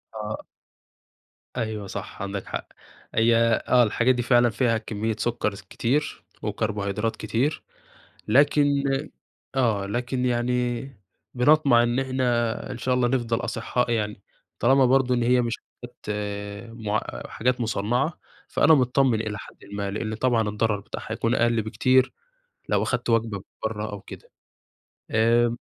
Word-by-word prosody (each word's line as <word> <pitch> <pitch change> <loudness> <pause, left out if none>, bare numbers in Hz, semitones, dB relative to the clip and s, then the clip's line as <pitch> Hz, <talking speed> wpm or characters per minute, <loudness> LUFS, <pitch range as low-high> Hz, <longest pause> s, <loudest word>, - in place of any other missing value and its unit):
آه. 105 0 -4 1.2
أيوه 110 -4 -3
صح - - -7
عندك 100 0 -4
حق. - - -5 0.5
هي 115 +1 +4 0.3
آه، 125 -1 +6
الحاجات 120 +3 +2
دي 120 - 0
فعلًا 120 0 +4
فيها 115 +1 +1
كميّة 110 0 -3
سكر 120 -3 -1 0.2
كتير 140 +6 -1 0.2
وكربوهيدرات 105 0 -2
كتير، 135 +7 -1 0.6
لكن 145 +5 +5 0.9
آه، 115 -7 +1
لكن 125 +4 -2
يعني 120 0 0 0.5
بنطمع 135 -1 +5
إن 120 +1 +1
إحنا 125 -3 0
إن 125 - -6
شاء 125 +1 0
الله 125 -1 +2
نفضل 120 -2 0
أصحاء 120 +2 -1
يعني، 105 -3 -1 0.4
طالما 135 0 +5
برضو 130 0 +3
إن 120 - +1
هي 125 +1 +4
مش 120 -1 -1
حاجات 120 0 -14 0.7
مع 110 -2 -2 0.3
حاجات 125 +2 0
مصنعة 120 +7 0 0.3
فأنا 160 - +5
متطمن 125 -3 +3
إلى 110 -2 -3
حدٍ - - -12
ما، 100 -1 -2
لأنّ 110 +2 -3
طبعًا 115 -1 +1
الضرر 105 0 0
بتاعها - - -7
يكون - - 0
أقل 120 -1 +2
بكتير 130 +4 +2 0.6
لو - - +2
أخدت 120 -1 -1
وجبة 115 -4 +1 0.2
برّه 110 -1 -2
أو 100 - -6
كده. - - -12 0.8
آمم 115 +2 +3
120 Hz, 135 wpm, -25 LUFS, 110-125 Hz, 1.2 s, آه